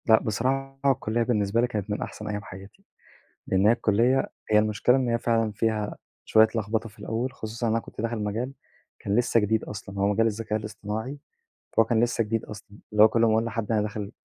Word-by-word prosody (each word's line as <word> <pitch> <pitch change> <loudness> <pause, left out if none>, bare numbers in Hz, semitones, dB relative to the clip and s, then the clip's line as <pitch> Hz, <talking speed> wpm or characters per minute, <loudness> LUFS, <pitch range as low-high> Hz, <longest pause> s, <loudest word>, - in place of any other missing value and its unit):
لأ، 110 -1 +6
بصراحة 135 +5 -1
الكلِّية 115 -2 0
بالنسبة 110 -1 +1
لي 125 - +2
كانت 105 -4 -4
من 105 - -2
أحسن 105 - -6
أيام 105 -1 -3
حياتي؛ 95 +1 -12 0.6
لإن 95 +1 +2
هي 110 - +7
الكلِّية 120 +3 +2 0.2
هي 105 - +6
المشكلة 110 +4 +3
إن 130 -2 0
هي 115 0 +1
فعلًا 115 -2 +1
فيها 105 0 -1 0.3
شوية 110 0 +5
لخبطة 110 +1 -1
في 105 - -20
الأول، 120 +4 -3
خصوصًا 115 -1 -5
إن 110 - +1
أنا 115 - +1
كنت - - -10
داخل 115 0 -2
مجال 115 +6 -2 0.5
كان 100 +1 -1
لسه 120 -1 +3
جديد 110 +1 +1
أصلًا، 100 -1 -8
هو 100 - +3
مجال 115 +2 +2
الذكاء 110 0 -1
الاصطناعي، 110 +5 -5 0.6
فهو 115 - +5
كان 115 0 +2
لسه 120 -1 +1
جديد 110 +1 -2
أصلًا، 105 0 -11
اللي 105 0 +6
هو - - +9
كل 115 +1 +1
أما 115 - +4
أقول 110 +1 +2
لحد 115 -1 -3
أنا 110 -2 +2
داخل 105 -1 -4
110 Hz, 210 wpm, -26 LUFS, 105-115 Hz, 0.6 s, هو